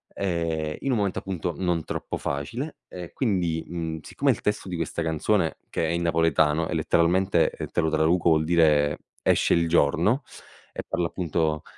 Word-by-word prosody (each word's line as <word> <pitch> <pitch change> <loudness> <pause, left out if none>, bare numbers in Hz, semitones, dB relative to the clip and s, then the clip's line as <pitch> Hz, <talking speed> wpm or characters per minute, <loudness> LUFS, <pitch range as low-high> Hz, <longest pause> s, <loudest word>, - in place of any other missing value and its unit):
ehm, 85 -5 -2
in 135 - -1
un 120 - +2
momento 100 -3 0
appunto 90 -3 -3
non 90 -3 0
troppo - - -4
facile 115 - -4
e 90 -2 -8
quindi, 90 -9 0
mhmm, 80 -2 -4
siccome 140 +8 0
il 115 - -2
testo 105 -2 -2
di 90 - -3
questa 85 +1 -3
canzone, 80 +3 0
che 80 - -1
è - - -1
in 85 0 -1
napoletano 80 -1 +2
e - - -2
letteralmente, 90 +1 +2
ehm, - - -6
te 85 - -1
lo 80 - +1
traduco, 80 +3 +2
vuol 80 -1 +3
dire 75 -3 +3 0.2
"esce - - +3
il 85 0 +2
giorno", 85 - +2 0.5
e - - -5
parla 85 - 0
appunto 80 -3 -1
85 Hz, 180 wpm, -25 LUFS, 80-90 Hz, 0.5 s, vuol